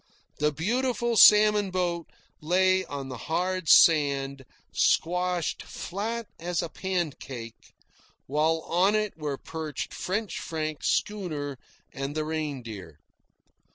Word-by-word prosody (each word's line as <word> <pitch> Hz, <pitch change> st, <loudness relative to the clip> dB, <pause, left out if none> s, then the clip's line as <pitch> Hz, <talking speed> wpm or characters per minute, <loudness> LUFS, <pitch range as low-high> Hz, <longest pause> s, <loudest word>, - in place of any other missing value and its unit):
The 150 Hz, 0 st, +2 dB
beautiful 235 Hz, -, 0 dB
salmon 210 Hz, -1 st, +7 dB
boat 175 Hz, -2 st, -2 dB, 0.3 s
lay 185 Hz, +3 st, +3 dB
on 140 Hz, -2 st, -6 dB
the 130 Hz, -, -6 dB
hard 180 Hz, 0 st, -1 dB
sand, 140 Hz, -4 st, +5 dB, 0.3 s
squashed 180 Hz, 0 st, +1 dB
flat 225 Hz, +5 st, -4 dB
as 175 Hz, 0 st, -2 dB
a -, -, -4 dB
pancake, 145 Hz, -11 st, -5 dB, 0.5 s
while 155 Hz, +3 st, +1 dB
on 185 Hz, +5 st, +2 dB
it 215 Hz, -1 st, -1 dB
were 150 Hz, -3 st, -4 dB
perched 155 Hz, -2 st, -6 dB
French 205 Hz, +3 st, -3 dB
Frank's 155 Hz, -2 st, -3 dB
schooner 155 Hz, -10 st, -2 dB, 0.3 s
and 135 Hz, +2 st, -4 dB
the 155 Hz, 0 st, -1 dB
Reindeer. 125 Hz, -, -5 dB
165 Hz, 110 wpm, -27 LUFS, 145-185 Hz, 0.5 s, salmon